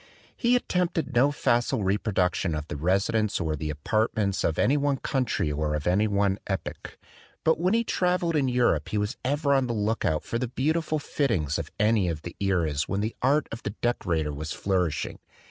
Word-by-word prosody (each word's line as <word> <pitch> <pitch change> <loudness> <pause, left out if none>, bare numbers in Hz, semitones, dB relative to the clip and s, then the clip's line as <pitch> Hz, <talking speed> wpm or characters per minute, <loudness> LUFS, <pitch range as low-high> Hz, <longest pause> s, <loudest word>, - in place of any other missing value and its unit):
He 240 0 +2
attempted 180 - 0
no 130 +4 +4
facile 120 -3 +1
repro 100 +3 0
duction 90 -3 +1
of 75 0 -6
the - - -4
residence 100 +7 +1
or 80 -2 -1
the 75 +1 -4
apartments 100 +6 0
of 80 - 0
any 140 - +3
one 145 -1 +1
country 125 - -1
or 75 +1 -1
of 75 - -4
any 100 +5 +3
one 100 -1 +1
epoch; 95 -1 -5 0.5
but 160 - +3
when 185 +5 +2
he 230 - +2
travelled 180 -5 0
in 140 -3 +2
Europe 125 -1 +2
he 105 - -1
was 105 +4 -1
ever 140 +2 +1
on 135 -2 +2
the 120 - -2
look 110 +2 0
out 80 -1 0
for 115 - -3
the 125 - -1
beautiful 155 +5 0
fittings 110 - 0
of 80 - -5
any 105 -2 +3
of 80 -2 -4
the 85 - -7
eras 85 -7 0
when 100 0 0
the 110 +2 -2
art 140 +4 +3
of 115 - -6
the 105 - -5
decorator 80 -11 0
was 75 +2 -5
flourishing. 90 -5 -1
105 Hz, 195 wpm, -26 LUFS, 85-135 Hz, 0.5 s, no